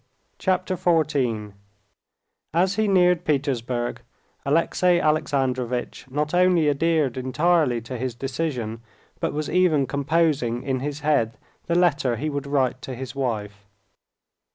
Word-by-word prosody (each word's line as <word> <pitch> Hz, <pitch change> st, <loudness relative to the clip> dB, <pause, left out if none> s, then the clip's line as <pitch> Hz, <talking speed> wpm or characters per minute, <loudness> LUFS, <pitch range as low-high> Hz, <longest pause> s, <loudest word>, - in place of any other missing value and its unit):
Chapter 185 Hz, 0 st, 0 dB
14 135 Hz, -, +1 dB, 1.0 s
As 185 Hz, +3 st, +3 dB
he 215 Hz, +1 st, +1 dB
neared 180 Hz, -3 st, +4 dB
Petersburg, 130 Hz, -5 st, -1 dB, 0.4 s
Alexey 170 Hz, +4 st, +2 dB
Alexandrovitch 130 Hz, -5 st, -1 dB
not 150 Hz, +4 st, -2 dB
only 180 Hz, -3 st, +4 dB
adhered 150 Hz, -3 st, +1 dB
entirely 130 Hz, 0 st, +2 dB
to 120 Hz, +2 st, -7 dB
his 125 Hz, -1 st, -3 dB
decision, 125 Hz, -5 st, -3 dB, 0.4 s
but -, -, -1 dB
was 150 Hz, +1 st, -3 dB
even 170 Hz, -6 st, +3 dB
composing 140 Hz, -4 st, 0 dB
in 130 Hz, -1 st, -1 dB
his 145 Hz, +2 st, -4 dB
head 140 Hz, -7 st, +1 dB, 0.3 s
the 170 Hz, -, +1 dB
letter 145 Hz, -8 st, +2 dB
he 150 Hz, +7 st, -3 dB
would 140 Hz, 0 st, -4 dB
write 130 Hz, -3 st, 0 dB
to 130 Hz, -, -6 dB
his 130 Hz, +1 st, -6 dB
wife. 105 Hz, -7 st, -4 dB
140 Hz, 125 wpm, -24 LUFS, 125-165 Hz, 1.0 s, neared